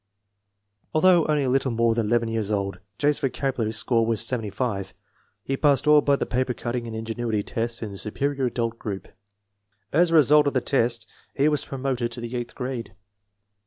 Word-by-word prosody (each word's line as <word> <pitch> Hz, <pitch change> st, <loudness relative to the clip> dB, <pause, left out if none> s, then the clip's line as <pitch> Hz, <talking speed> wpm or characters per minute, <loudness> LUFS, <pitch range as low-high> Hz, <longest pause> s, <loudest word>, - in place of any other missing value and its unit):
Although 175 Hz, 0 st, +5 dB
only 150 Hz, -2 st, +2 dB
a 130 Hz, -, 0 dB
little 135 Hz, +1 st, +1 dB
more 115 Hz, -1 st, +2 dB
than 115 Hz, -2 st, -1 dB
11 115 Hz, 0 st, +1 dB
years 110 Hz, -2 st, -2 dB
old, 100 Hz, -3 st, -2 dB, 0.2 s
J.'s 145 Hz, 0 st, +2 dB
vocabulary 130 Hz, -4 st, -1 dB
score 115 Hz, +1 st, +1 dB
was 115 Hz, -1 st, +1 dB
75. 110 Hz, -4 st, -3 dB, 0.5 s
He 135 Hz, -, -1 dB
passed 140 Hz, -1 st, +3 dB
all 150 Hz, 0 st, +6 dB
but 140 Hz, -1 st, +2 dB
the -, -, 0 dB
paper 125 Hz, 0 st, -1 dB
cutting 120 Hz, 0 st, -3 dB
and 110 Hz, -, -6 dB
ingenuity 110 Hz, -1 st, -2 dB
tests 115 Hz, +2 st, -3 dB
in 105 Hz, -, -5 dB
the 100 Hz, -, -8 dB
Superior 135 Hz, +5 st, -2 dB
Adult 115 Hz, -2 st, -2 dB
group. 95 Hz, -3 st, -5 dB, 0.8 s
As 170 Hz, +3 st, +4 dB
a 165 Hz, -, +2 dB
result 150 Hz, -1 st, +6 dB
of 140 Hz, -, 0 dB
the -, -, +4 dB
test 115 Hz, -4 st, 0 dB, 0.3 s
he 140 Hz, +2 st, +3 dB
was 150 Hz, -2 st, +1 dB
promoted 130 Hz, -3 st, -2 dB
to 120 Hz, -, -4 dB
the 120 Hz, +1 st, -5 dB
eighth 120 Hz, -1 st, -5 dB
grade. 125 Hz, -5 st, -5 dB
120 Hz, 185 wpm, -24 LUFS, 115-140 Hz, 0.8 s, all